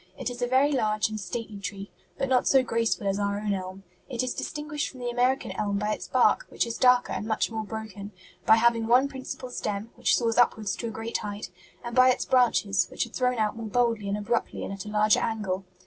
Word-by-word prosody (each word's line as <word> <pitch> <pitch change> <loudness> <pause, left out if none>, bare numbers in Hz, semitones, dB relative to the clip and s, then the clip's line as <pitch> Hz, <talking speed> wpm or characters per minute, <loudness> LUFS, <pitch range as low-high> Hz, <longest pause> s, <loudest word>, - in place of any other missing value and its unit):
It - - -3
is 245 0 -8
a 245 - +1
very 265 +4 +3
large 215 -5 +1
and 215 0 -5
stately 210 +2 -5
tree, 200 0 -6 0.3
but 270 - -1
not 255 -1 +2
so 265 -1 +5
graceful 230 -3 0
as 195 0 0
our 200 0 0
own 210 -1 -1
elm. 190 0 -6 0.3
It 255 -1 -1
is 255 - -2
distinguished 300 -1 -4
from 260 - -13
the 245 0 -2
American 250 +2 +1
elm 205 -1 -1
by 210 +1 0
its - - -6
bark, - - +3
which - - 0
is 230 -1 -5
darker 250 -1 +4
and 215 - -4
much 220 +1 0
more 220 -1 -3
broken; 215 -2 -7 0.3
by 220 - +7
having 230 0 +2
one 250 +4 +5
principal 260 -2 -7
stem, 210 0 -4
which 245 - +2
soars 230 -1 +1
upward 220 -3 +3
to 220 +4 -2
a - - -3
great 225 +1 -3
height; 205 0 -6 0.3
and 235 0 -6
by 255 0 +7
its 255 - +1
branches, 210 -7 +3
which - - -2
are 235 - -14
thrown 250 0 0
out 215 -1 0
more 225 -1 -6
boldly 230 -2 +1
and 200 - 0
abruptly 230 +3 -2
and - - -4
at 195 0 -7
a - - -6
larger 210 0 +3
angle. 195 -4 -2
225 Hz, 235 wpm, -27 LUFS, 205-245 Hz, 0.3 s, by